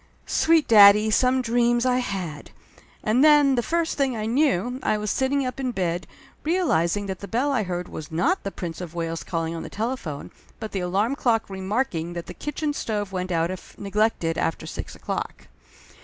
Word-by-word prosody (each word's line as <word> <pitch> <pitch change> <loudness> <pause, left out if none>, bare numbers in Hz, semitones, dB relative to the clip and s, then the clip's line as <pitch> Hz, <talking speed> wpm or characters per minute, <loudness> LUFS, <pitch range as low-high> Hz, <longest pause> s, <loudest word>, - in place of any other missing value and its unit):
Sweet 325 -1 +3
daddy, 210 0 +7
some 255 +3 +3
dreams, 240 +1 +2
I 250 0 +2
had! 185 -11 -4 0.5
And 235 +5 +3
then 295 -3 +6
the 245 - +2
first 330 +3 -1
thing 265 -4 +1
I 215 - -3
knew, 250 - +1
I 215 - +1
was 210 -1 -2
sitting 270 +1 +1
up 255 +1 -4
in 260 -1 -1
bed, 175 -5 -2 0.4
realizing 205 - +1
that 190 -2 -5
the 200 - -8
bell 255 +7 0
I 255 -5 +1
heard 180 -2 -3
was 155 0 -8
not 330 - +1
the 195 - -3
Prince 175 -3 -6
of 175 -2 -8
Wales 165 -1 -3
calling 165 -1 -2
on 165 - -5
the - - -7
telephone, 215 - -4 0.3
but 220 - -6
the 195 - -2
alarm 195 +8 0
clock 230 -7 0
remarking 190 -3 -2
that 170 -1 -5
the - - -8
kitchen 295 0 -3
stove 210 -7 -3
went 185 -1 -3
out 165 +1 +1
if 185 - -10
neglected 200 -5 0
after 165 - -2
six - - -7
o'clock. - - -5
215 Hz, 190 wpm, -24 LUFS, 180-255 Hz, 0.5 s, daddy